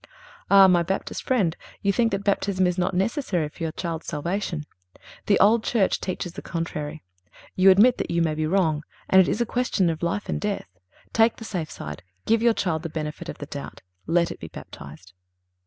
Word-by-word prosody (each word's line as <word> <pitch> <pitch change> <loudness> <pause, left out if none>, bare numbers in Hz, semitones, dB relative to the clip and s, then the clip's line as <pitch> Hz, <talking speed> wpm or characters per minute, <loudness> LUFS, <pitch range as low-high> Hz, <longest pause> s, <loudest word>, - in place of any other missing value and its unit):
Ah! 195 -1 +8
my 180 -2 +4
Baptist 190 +3 -3
friend, 200 -11 +1 0.3
you 200 0 +2
think 230 0 +2
that 195 0 -2
Baptism 195 -2 +1
is 180 -1 +1
not 180 +1 0
necessary 190 - 0
for 150 - -17
your 165 -1 -1
child's 165 -1 -5
salvation. 170 0 -3 0.6
The 200 - +4
old 220 +2 +5
Church 215 -6 +1
teaches 180 -2 -4
the - - -7
contrary. 160 -2 -5 0.5
You 190 +1 +6
admit 215 +7 +6
that - - -2
you 170 - 0
may 160 -2 +1
be 155 0 -1
wrong, 160 -4 +1 0.3
and 190 - +8
it 185 - +2
is 230 - 0
a - - +2
question 225 -8 +1
of 160 - -6
life 175 +4 -2
and - - -2
death. 95 - -4 0.3
Take 225 0 +4
the 225 - -10
safe 175 -8 -4
side. 75 +3 -7 0.2
Give 225 0 +3
your 235 -1 +4
child 160 -5 -1
the 165 - -5
benefit 155 -1 -5
of - - -6
the 145 - -7
doubt. 140 0 -8 0.3
Let 170 +1 +2
it - - -8
be 80 - -7
baptized. 75 +5 -11
180 Hz, 205 wpm, -24 LUFS, 160-200 Hz, 0.6 s, Ah